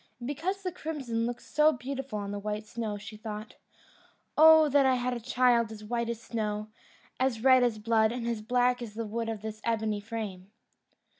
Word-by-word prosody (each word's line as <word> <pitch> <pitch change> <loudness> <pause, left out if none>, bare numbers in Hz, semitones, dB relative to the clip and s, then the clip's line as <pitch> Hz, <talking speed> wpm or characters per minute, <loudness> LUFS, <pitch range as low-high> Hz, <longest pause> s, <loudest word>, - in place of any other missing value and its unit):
And 240 - -8
because 355 +8 -3
the 365 - -2
crimson 270 -9 -3
looked 240 0 -5
so 305 +1 +4
beautiful 265 -2 -5
on 200 -1 -4
the 205 - -4
white 210 +1 -4
snow, 220 -2 -4
she 210 +1 -10
thought, 215 0 -7 0.8
"Oh 315 0 +8
that 285 -1 +4
I 260 -1 +4
had 250 0 -1
a 240 - -3
child 235 -1 +2
as 215 -1 -9
white 235 +2 -2
as 235 -1 -3
snow, 215 -2 -3 0.5
as 250 -3 0
red 260 -1 +7
as 240 -3 +2
blood, 220 0 +2
and 240 -1 -4
as 230 -2 -2
black 245 +2 +2
as 220 -3 -7
the 230 0 -3
wood 225 +2 -3
of 220 -2 -5
this 215 0 -6
ebony 220 -2 0
frame!" 205 -4 -6
230 Hz, 200 wpm, -29 LUFS, 215-255 Hz, 0.8 s, Oh